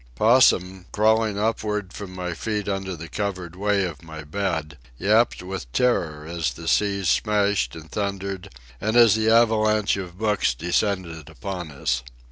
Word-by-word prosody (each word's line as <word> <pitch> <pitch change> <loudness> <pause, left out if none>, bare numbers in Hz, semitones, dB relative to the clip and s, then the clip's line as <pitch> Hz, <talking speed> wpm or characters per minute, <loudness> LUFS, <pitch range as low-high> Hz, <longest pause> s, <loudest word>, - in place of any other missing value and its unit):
Possum, 95 - +3
crawling 110 0 +2
upward 105 -2 -1
from 95 -3 -8
my 90 -1 -3
feet 105 +4 -3
under 95 -2 -2
the 80 0 -8
covered 90 -3 -4
way 100 +1 +1
of 80 -4 -6
my 80 -1 -9
bed, 80 -3 -3 0.2
yapped 105 - +2
with 90 -10 -6
terror 80 -12 +1
as 80 -4 -2
the 80 +6 -9
seas 100 +1 +1
smashed 105 -1 +1
and 80 0 -11
thundered 100 -2 -3 0.3
and 110 +4 +1
as 115 -3 +7
the 110 0 +2
avalanche 110 -3 +3
of 90 -2 -7
books 105 - +1
descended 90 - -1
upon 90 0 -6
us. 65 -3 -1
95 Hz, 150 wpm, -24 LUFS, 85-105 Hz, 0.3 s, as